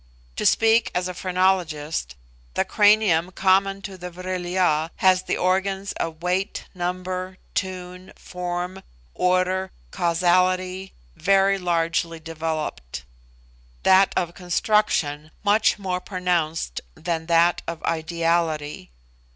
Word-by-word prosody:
To - - +2
speak 225 +1 +4
as 180 0 0
a 180 - -4
phrenologist, 175 - 0 0.4
the - - +1
cranium 205 -5 +4
common 195 +1 +2
to 190 -2 -8
the 180 +1 -6
Vril 180 0 -5
ya 170 -3 +1
has 185 -1 +4
the - - -2
organs 190 +2 0
of 160 0 -5
weight, 185 +3 -1
number, 185 +1 -4 0.2
tune, 180 -1 -4
form, 180 +1 -5 0.3
order, 185 +1 +1 0.2
causality, 185 +2 +1 0.2
very 195 +2 +3
largely 165 -1 0
developed; 155 - -4 0.8
that 190 +1 +5
of 175 -1 -1
construction 175 -5 0
much 210 +1 +3
more 185 -3 -3
pronounced 175 - -1
than 165 -1 -3
that 170 +1 +3
of 165 -1 -5
ideality. 165 - -1
180 Hz, 110 wpm, -23 LUFS, 165-190 Hz, 0.8 s, that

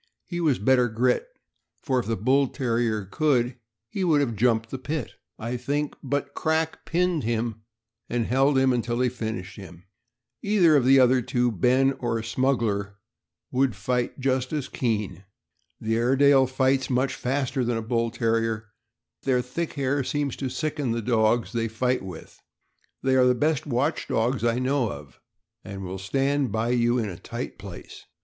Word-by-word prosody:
He 175 -1 -4
was 150 -6 +2
better 125 +3 +3
grit, 125 - +1 0.6
for 130 -3 +1
if 120 - -4
the 115 - 0
Bull 130 +7 +3
Terrier 115 -5 -1
could, 125 +2 +1 0.3
he 190 - -3
would 160 -5 +3
have 125 -6 0
jumped 115 0 +1
the 130 - -4
pit, 150 +4 -4 0.3
I 115 +3 -3
think; 145 +4 -2
but 140 +1 -2
Crack 160 0 -1
pinned 175 -1 +1
him 115 -1 -2 0.5
and 120 -1 0
held 135 +3 +3
him 130 -1 +4
until 120 0 -1
he 125 0 +2
finished 110 -5 -5
him. 90 -3 -11 0.6
Either 190 -7 +4
of 135 -4 +3
the 135 +1 +6
other 130 0 +5
two, 120 +1 0
Ben 130 +7 +3
or 115 -2 -1
Smuggler, 110 -5 0 0.6
would 130 -3 +1
fight 125 +7 -2
just 130 -1 0
as 150 -4 -2
keen. 105 -7 -2 0.6
The 110 +1 -1
Airedale 135 +2 +4
fights 130 +1 +1
much 130 +1 +1
faster 130 0 -1
than 120 0 0
the 115 - -2
Bull 115 0 0
Terrier, 115 -1 0
and 105 -2 -32 0.6
their 125 -2 +3
thick 155 +7 -4
hair 140 -1 0
seems 145 +1 -2
to 135 - -3
sicken 140 -1 -2
the 115 - -2
dogs 115 0 +2
they 115 -2 -1
fight 125 +3 0
with. 90 -4 -10 0.6
They 130 0 +2
are 130 - +5
the 125 0 +4
best 150 +3 0
watch 140 +4 0
dogs 115 +1 0
I 120 0 +2
know 130 -2 0
of, 70 0 -11 0.4
and 95 -1 -7
will 95 +1 -5
stand 135 +5 0
by 110 +2 -1
you 120 0 +2
in 115 -3 -1
a 90 -4 -7
tight - - -6
place. - - -10
125 Hz, 170 wpm, -25 LUFS, 115-135 Hz, 0.6 s, the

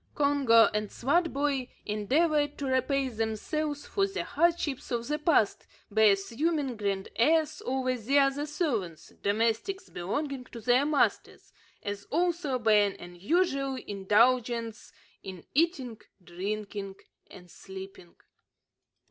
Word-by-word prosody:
Congo 275 -6 +5
and 210 -1 -2
Swartboy 285 -3 0 0.2
endeavoured 290 +8 +1
to 285 - -4
repay 265 +1 +1
themselves 255 +7 -3
for 395 -1 0
the 390 - -4
hardships 335 -5 0
of 235 -1 -2
the 300 +1 -1
past, 300 - +2 0.2
by 220 +1 +4
assuming 250 +8 +1
grand 200 -2 -2
airs 310 +5 +2
over 255 0 0
the 250 +4 0
other 280 +1 +2
servants, 235 - -3
domestics 225 - -1
belonging 265 - -3
to 240 - -10
their 250 +5 +3
masters, 300 -2 0 0.3
as 200 0 -5
also 335 -4 0
by 225 -3 +2
an 205 -1 +3
unusual 275 - -1
indulgence 230 +2 +1 0.3
in 185 -3 -9
eating, 275 -8 0 0.2
drinking, 195 +2 -5 0.3
and 180 -2 -14
sleeping. 190 -2 -11
255 Hz, 115 wpm, -29 LUFS, 210-295 Hz, 0.3 s, Congo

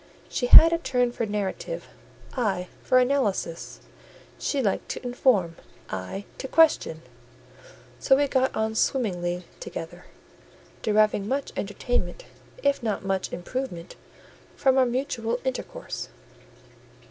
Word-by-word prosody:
She 245 - -1
had 330 +6 +10
a 335 - +1
turn 250 -6 +1
for 230 -2 -3
narrative, 210 - -3 0.5
I 195 -8 -1
for 255 - +3
analysis; 250 -10 0 0.6
she 285 - -1
liked 210 -7 -1
to - - -5
inform, 230 -9 +2 0.3
I 95 - -5
to 265 - -4
question; 295 - +3 1.0
so 270 - +4
we 285 +1 +2
got 260 -1 +1
on 220 0 0
swimmingly 180 -8 0
together, - - -7 0.8
deriving 215 -2 +2
much 275 +4 -2
entertainment, 205 -2 -2 0.4
if 280 -1 +2
not 215 -4 -2
much 195 -1 -1
improvement, 175 -1 -5 0.6
from 265 -1 +3
our 255 - +4
mutual 240 -2 -2
intercourse. 255 - -4
235 Hz, 115 wpm, -26 LUFS, 195-265 Hz, 1.0 s, had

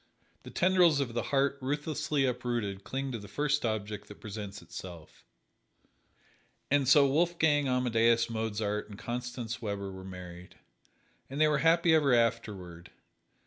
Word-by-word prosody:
The - - -11
tendrils 175 -4 +4
of 130 -4 -2
the 120 - 0
heart 140 -1 +1
ruthlessly 150 +1 -1
uprooted 120 -6 -2
cling 135 +3 -3
to 115 - -4
the 100 - -10
first 145 +7 0
object 105 -2 -3
that 105 - -12
presents 105 -1 -7
itself. 85 -4 -10 1.5
And 140 -2 +3
so 140 +2 +6
Wolfgang 155 -1 +2
Amadeus 115 -2 +2
Mozart 110 -2 -2
and 100 - -10
Constance 120 0 -5
Weber 100 -3 -4
were 95 0 -9
married. 90 -1 -10 0.7
And 135 +2 -5
they 155 - +5
were 150 -2 +2
happy 165 +1 +4
ever 145 -5 +4
afterward. 105 -8 -1
120 Hz, 140 wpm, -30 LUFS, 105-145 Hz, 1.5 s, so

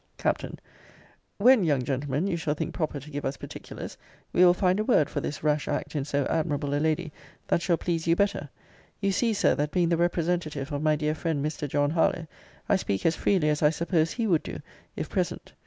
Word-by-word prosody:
Capt. - - 0 0.9
When, 240 0 +6
young 145 -6 +2
gentleman, 135 +4 -1
you 195 -3 0
shall 160 -3 -1
think 160 0 -3
proper 155 -4 -2
to 145 +3 -12
give 145 0 -4
us 135 +1 -2
particulars, - - -8 0.4
we 180 - +5
will 180 -1 +7
find 185 +1 +2
a - - +2
word 185 - +3
for - - -2
this 145 - -5
rash 150 -1 +1
act - - -3
in 140 -2 -1
so 145 -1 0
admirable 145 -3 -1
a 145 - +1
lady, 160 +1 0 0.4
that 170 - +2
shall 170 -1 +2
please 165 -1 -2
you 165 - +4
better. 200 -7 0 0.5
You 200 -1 +1
see, 230 +4 +1
Sir, 210 - +3
that 145 +1 -1
being 175 0 +1
the 170 - +2
representative 170 -4 -1
of 145 0 -2
my 155 0 +3
dear 150 0 0
friend 155 -2 -2
Mr. 150 -1 -3
John 145 +1 +1
Harlowe, 165 0 +1 0.4
I - - +4
speak 100 - -2
as 165 0 +3
freely 180 -7 +2
as 150 0 0
I 150 - +6
suppose 165 0 0
he 230 - -1
would 170 -7 +3
do, - - -7 0.4
if - - -3
present. - - -3
155 Hz, 220 wpm, -27 LUFS, 145-175 Hz, 0.9 s, will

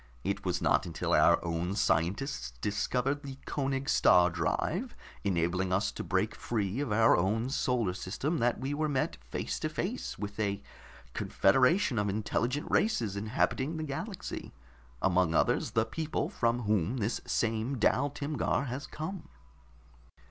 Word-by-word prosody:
It - - -2
was - - -1
not - - +3
until 80 - -2
our - - +6
own 85 +3 -1
scientists 85 - 0
discovered 125 - 0
the 135 -2 -8
Koenig 135 -1 -2
star 90 -1 +5
drive, 85 -1 -1 0.3
enabling 90 0 0
us 95 +3 +1
to - - -6
break 100 +3 0
free 105 0 -2
of 145 -6 -2
our 110 +2 +5
own 110 +8 0
solar 120 -8 +1
system, 135 - -2
that 120 0 +1
we 135 +3 -2
were 155 +1 0
met 135 -3 -1
face - - -3
to - - -1
face 65 +1 -3
with 105 +1 -6
a 100 -2 -1 0.5
confederation 130 - +3
of 105 0 0
intelligent 115 +7 -1
races 115 - +1
inhabiting 130 +8 0
the 155 - -3
galaxy 180 +8 -5 0.5
among 90 -3 +3
others, - - +2
the 110 0 +3
people 160 +3 -2
from 120 +1 0
whom 105 +2 +1
this 110 0 -1
same 115 +4 0
Dal 130 +5 +2
Timgar 145 -1 -1
has 130 +3 -5
come." 165 +4 -6
115 Hz, 150 wpm, -31 LUFS, 95-140 Hz, 0.5 s, our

